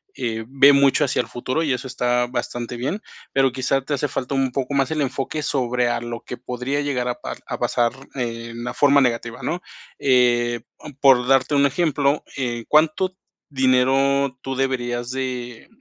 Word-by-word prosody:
eh, 115 -3 -3
ve 140 +2 +6
mucho 140 +1 +4
hacia 130 - +1
el - - -9
futuro 130 +6 -2
y 150 - 0
eso 130 +1 -4
está 125 -1 +1
bastante 120 -1 -4
bien, 145 - -2 0.3
pero 135 -1 +3
quizás 130 +1 -1
te 145 - -2
hace 145 +1 0
falta 130 -1 -4
un 135 -1 +1
poco 135 +2 -2
más 135 -2 +2
el 155 -1 0
enfoque 140 +3 -2
sobre 125 -2 0
a 120 0 -1
lo 120 0 -6
que - - -6
podría 125 +3 -3
llegar 130 -4 -1
a 125 - -1
par - - -5
a - - -5
pasar 120 -1 +1 0.2
en 115 -2 -4
una 120 +1 -4
forma 140 -1 +5
negativa, 120 -1 -1
¿no?, 180 +1 -2 0.4
eh, 120 -3 +3 0.2
o 155 - -10
mm 145 - -13
por 130 -3 +5
darte 135 +2 +3
un 140 0 +4
ejemplo, 145 -1 +1
eh, 120 -3 -3
cuánto 160 +5 +2 0.4
dinero 130 +1 +2
tú 135 0 -4
deberías 120 -2 -1
de 125 -3 -5
130 Hz, 185 wpm, -22 LUFS, 120-140 Hz, 0.4 s, ve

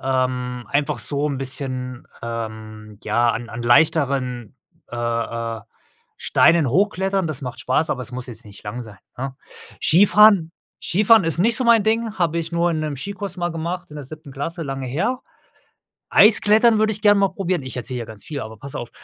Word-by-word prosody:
ähm, 125 -1 -1
einfach 145 0 0
so 145 0 -2
'n 140 - -3
bisschen, 130 -2 -5 0.2
ähm, 110 -2 -7
ja, 120 +2 +2
an 115 +1 -5
an 120 0 -6
leichteren, 130 -3 +1 0.3
äh, 120 - -6
äh, 115 -1 -3 0.6
Steinen 165 -5 +3
hochklettern. 195 - +1
Das 150 -3 -5
macht 125 -1 -6
Spaß, 130 +5 0
aber 130 - -2
es 125 - -10
muss 125 0 -6
jetzt 120 -3 -8
nicht 105 -1 -13
lang 110 +4 -5
sein, 105 -5 -12 0.2
ne? 135 +1 -5 0.4
Skifahren 200 0 +5 0.3
Skifahren 210 +1 +4
ist 165 0 +2
nicht 220 +5 +3
so 255 - 0
mein 230 -2 +5
Ding, 220 0 -1
habe 170 -1 +1
ich 165 0 -5
nur 170 +1 +1
in 155 -2 -1
'nem 150 -2 -3
Skikurs 195 +5 -6
mal 175 0 -1
gemacht 170 +2 -4
in 150 - -10
der 145 - -7
7. 155 0 -10
Klasse, 165 +5 -4
lange 135 -2 -4
her. 205 - -1 0.9
Eis-Klettern 215 +1 +6
würde 215 0 +2
ich 205 - -5
gerne 205 -1 +5
mal 195 - +3
probieren 185 -5 -2
ich 130 - -7
erzähle 125 +1 -4
hier 115 - -5
ganz 110 -2 -11
viel, 145 -3 -5
aber 110 0 -8
pass 140 +4 -10
auf. 120 - -6
140 Hz, 190 wpm, -21 LUFS, 125-185 Hz, 0.9 s, Eis-Klettern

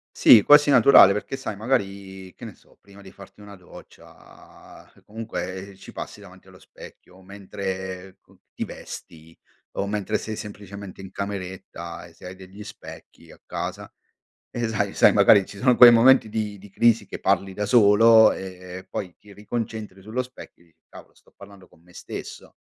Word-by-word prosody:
Sì, 110 - +7
quasi 145 +5 +5
naturale 120 -9 +7
perché 105 +6 -5
sai 120 -5 -6
magari 100 -5 -4
che - - -16
ne 110 - -10
so, - - -27
prima 100 0 -17
di 95 - -14
farti 100 +1 -16
una 100 0 -12
doccia 90 -2 -17
comunque 100 -3 -7
ci 95 - -14
passi - - -9
davanti - - -17
allo - - -17
specchio, 95 +1 -16
mentre 95 -1 -7
con - - -26
ti - - -5
vesti 80 0 -12 0.4
o 100 - -2
mentre 105 +1 -2
sei 110 -1 -6
semplicemente 100 -2 -10
in 95 - -11
cameretta 95 -4 -7
e 85 - -20
se 85 - -16
hai 90 +1 -9
degli 95 +2 -13
specchi - - -13
a - - -18
casa, - - -6 0.6
e 120 -1 -3
sai 110 -2 -2
sai - - +5
magari 100 -2 +5
ci 100 - -12
sono 125 -1 +2
quei 120 -1 +9
momenti 120 0 +5
di 105 -2 -4
di 100 +1 -15
crisi 115 -1 +2
che - - -9
parli 95 0 0
da 105 - -3
solo 110 0 +5
e 90 -1 -9
e 95 - -19
poi 90 -4 -6
ti 105 - -18
riconcentri 105 -1 -7
sullo 110 +6 -4
specchio 125 -8 -15
e - - -29
dici: 80 -1 -33
"Cavolo - - -16
sto - - -27
parlando 100 -2 -16
con 80 - -25
me 90 0 -23
stesso". - - -10
100 Hz, 175 wpm, -23 LUFS, 95-110 Hz, 0.6 s, quei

